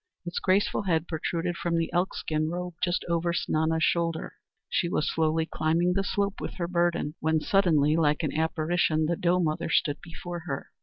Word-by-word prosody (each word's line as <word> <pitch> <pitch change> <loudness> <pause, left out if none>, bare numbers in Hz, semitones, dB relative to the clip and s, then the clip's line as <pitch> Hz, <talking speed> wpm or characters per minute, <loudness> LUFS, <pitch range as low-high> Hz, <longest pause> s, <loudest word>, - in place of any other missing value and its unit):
Its 175 - -3
graceful 195 +2 +2
head 170 -4 0
protruded 170 +2 -2
from 170 -1 -1
the 165 -1 -1
elk 180 +2 +1
skin 155 0 -1
robe 180 +1 -4
just 175 -1 0
over 170 0 0
Snana's 160 -1 0
shoulder. 165 -1 0 0.3
She 170 - 0
was 155 - 0
slowly 160 0 +1
climbing 165 +3 +1
the 195 +1 +1
slope 200 0 -1
with - - -5
her 170 -2 -2
burden, 170 -3 0
when 160 0 +2
suddenly 155 -5 +3
like 150 -1 +2
an 150 - -2
apparition 160 0 +1
the 170 +2 +1
doe 175 +2 +2
mother 155 -2 -1
stood 145 -2 +1
before 175 +1 -7
her. 135 -3 -4
170 Hz, 185 wpm, -27 LUFS, 160-175 Hz, 0.3 s, suddenly